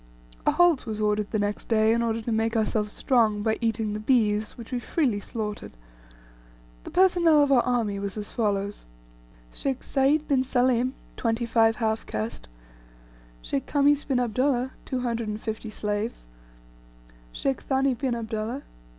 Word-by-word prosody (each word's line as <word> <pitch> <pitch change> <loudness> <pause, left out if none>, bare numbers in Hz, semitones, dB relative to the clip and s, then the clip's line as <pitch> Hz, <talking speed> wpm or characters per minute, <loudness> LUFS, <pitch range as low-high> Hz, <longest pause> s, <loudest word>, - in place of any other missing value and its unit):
A - - +6
halt 350 -8 +3
was 215 -1 -3
ordered 210 -1 0
the 215 - -1
next 205 0 -2
day, 220 -1 +3
in 235 - +1
order 230 -1 -1
to 235 - -3
make 225 +1 +1
ourselves 215 -1 0
strong 220 -6 +2
by 220 0 0
eating 225 -2 0
the 210 - -3
beeves, 215 -2 +1
which 235 0 -10
we 250 - -1
freely 245 -6 0
slaughtered. 210 0 -5 1.1
The - - -6
personnel 345 -5 +4
of 285 - +1
our 255 -3 +6
army 230 -6 0
was 200 0 -4
as 210 -1 -5
follows: 205 - -2 0.7
Sheikh 265 -2 -3
Sayd 285 +3 +2
bin 265 -2 +2
Salim...... 255 0 +1 0.2
25 225 -1 +2
half 220 -1 -1
caste 110 - -4 0.6
" - - -26 0.2
Khamis 290 0 +3
bin 265 -3 +1
Abdullah.... 255 +2 +1
250 225 -3 -3
slaves 210 - -3 0.6
" - - -25
Thani 270 0 0
bin 250 0 -1
Abdullah.... 225 +3 -4
225 Hz, 145 wpm, -26 LUFS, 210-255 Hz, 1.1 s, A